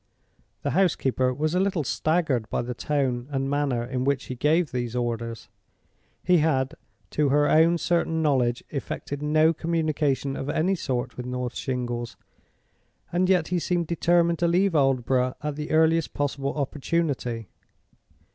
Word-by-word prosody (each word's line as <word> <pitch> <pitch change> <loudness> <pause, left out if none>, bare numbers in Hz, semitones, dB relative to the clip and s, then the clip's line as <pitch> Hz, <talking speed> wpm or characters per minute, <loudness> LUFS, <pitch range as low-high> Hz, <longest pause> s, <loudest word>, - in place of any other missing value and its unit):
The - - 0
housekeeper 130 -8 +2
was 155 +5 -1
a 180 - +2
little 190 -4 +1
staggered 145 -6 0
by - - -1
the 125 +1 -4
tone 130 -2 -1
and 135 -1 -1
manner 140 -4 0
in 125 +1 -3
which 140 0 0
he 130 - -6
gave 155 +5 +2
these 120 -1 -3
orders. 115 -2 -3 0.8
He 180 -1 +4
had, 140 -2 +1 0.4
to 150 -2 +1
her 145 +1 +3
own 165 +2 +4
certain 170 -1 0
knowledge, 125 -5 +1
effected 145 0 -5
no 155 +2 +3
communication 155 -4 -1
of 135 - -4
any 170 +6 +1
sort 125 -7 -3
with 125 0 -5
North 125 -1 -3
Shingles, 120 -3 -3 1.0
and 180 +1 +2
yet 180 -4 +3
he 180 0 +1
seemed 175 0 0
determined 170 0 +2
to 175 - +2
leave 180 +2 +2
Aldborough 130 -3 +2
at 150 -1 -2
the 150 +1 -5
earliest 160 0 +2
possible 140 -1 -2
opportunity. 140 - -2
145 Hz, 150 wpm, -25 LUFS, 125-165 Hz, 1.0 s, He